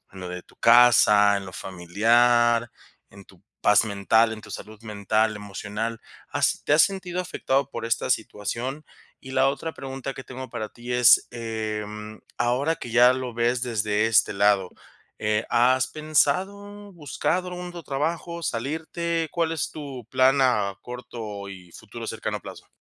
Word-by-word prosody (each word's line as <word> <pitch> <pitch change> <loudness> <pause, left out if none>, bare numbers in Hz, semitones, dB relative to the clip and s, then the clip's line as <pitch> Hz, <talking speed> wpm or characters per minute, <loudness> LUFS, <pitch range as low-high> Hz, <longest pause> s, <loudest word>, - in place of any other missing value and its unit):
en 95 - -12
lo 90 - -6
de 90 0 -6
tu - - -24
casa, 110 -4 +6
en 100 - -5
lo 95 - -9
familiar, 115 +7 +2 0.4
en 100 -1 -14
tu 95 -3 -21 0.2
paz 105 +2 +5
mental, 110 +2 +2
en 110 - -7
tu - - -13
salud 110 +1 -9
mental, 110 0 0
emocional?, 105 +3 -5 0.3
¿has - - 0
te - - +1
has 155 - +7
sentido 185 -2 -1
afectado 140 -6 -1
por - - -6
esta 115 +2 -1
situación?, 120 +6 -3 0.4
y 130 - -11
la 130 +1 +3
otra 160 +4 -3
pregunta 135 0 -6
que 130 - -9
tengo 130 -1 -8
para 110 -3 -4
ti 120 +1 -7
es, 125 -2 +6
eh, 110 -3 -4
mm, 105 +1 -8 0.2
ahora 130 +7 +1
que 120 - -8
ya 125 +2 +6
lo 130 -2 -4
ves 120 +1 0
desde 110 -2 0
este 115 - +3
lado, 100 -2 +2 0.5
eh, 105 +1 +1
¿has 130 +1 +3
pensado, 195 +7 -1
buscado 175 +3 -2
un 180 0 -6
otro 175 -1 -9
trabajo, 165 +4 -3
salirte?, 160 +6 -2
¿cuál 165 -1 0
es 160 -3 -2
tu 135 -6 -8
plan 130 +1 +4
a 105 -7 +2
corto 115 -5 -7
y 90 -2 -12
futuro - - -9
cercano - - -4
plazo? - - -11
120 Hz, 165 wpm, -25 LUFS, 105-140 Hz, 0.5 s, has